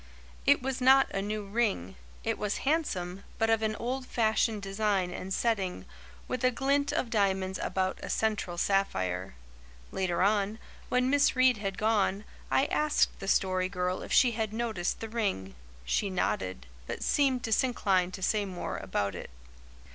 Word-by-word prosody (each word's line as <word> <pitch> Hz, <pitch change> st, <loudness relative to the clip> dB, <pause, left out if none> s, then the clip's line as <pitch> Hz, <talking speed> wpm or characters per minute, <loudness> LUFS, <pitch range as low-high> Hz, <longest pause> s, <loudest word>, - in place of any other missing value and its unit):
It -, -, +5 dB
was 265 Hz, -1 st, -2 dB
not 265 Hz, +1 st, +6 dB
a 195 Hz, -, -1 dB
new 210 Hz, +1 st, -3 dB
ring; 200 Hz, -, -1 dB, 0.3 s
it -, -, -1 dB
was 210 Hz, -1 st, -1 dB
handsome, 195 Hz, -, -1 dB
but 225 Hz, 0 st, +2 dB
of 225 Hz, -1 st, +3 dB
an 215 Hz, -1 st, 0 dB
old 255 Hz, +3 st, -3 dB
fashioned 220 Hz, -2 st, +1 dB
design 195 Hz, -2 st, 0 dB
and 185 Hz, +1 st, -6 dB
setting, 190 Hz, -, -1 dB, 0.4 s
with 255 Hz, -1 st, -3 dB
a 255 Hz, -, +5 dB
glint 280 Hz, +3 st, +1 dB
of 260 Hz, -6 st, -1 dB
diamonds 190 Hz, -3 st, +1 dB
about 190 Hz, 0 st, -1 dB
a -, -, -6 dB
central 210 Hz, -5 st, -1 dB
sapphire. 95 Hz, -, 0 dB, 0.6 s
Later 185 Hz, -2 st, 0 dB
on, 205 Hz, +1 st, +2 dB, 0.3 s
when 250 Hz, +1 st, +2 dB
Miss 285 Hz, -1 st, +4 dB
Reade 255 Hz, -2 st, +4 dB
had 195 Hz, -2 st, -4 dB
gone, 210 Hz, -2 st, +1 dB, 0.3 s
I 270 Hz, -, +3 dB
asked 300 Hz, 0 st, +1 dB
the 195 Hz, -, -6 dB
Story 185 Hz, -1 st, +2 dB
Girl 180 Hz, -1 st, -2 dB
if -, -, -8 dB
she 250 Hz, -, +5 dB
had 220 Hz, -2 st, -2 dB
noticed 220 Hz, -6 st, -2 dB
the 225 Hz, -, -4 dB
ring. 200 Hz, -, -2 dB, 0.3 s
She 200 Hz, -, 0 dB
nodded, 95 Hz, -, -2 dB, 0.2 s
but -, -, -4 dB
seemed 265 Hz, -4 st, +2 dB
disinclined 200 Hz, -6 st, +1 dB
to 190 Hz, -, -8 dB
say 210 Hz, +2 st, +2 dB
more 175 Hz, -, -4 dB
about 100 Hz, +1 st, -2 dB
it. 90 Hz, -, -7 dB
205 Hz, 160 wpm, -29 LUFS, 185-235 Hz, 0.6 s, not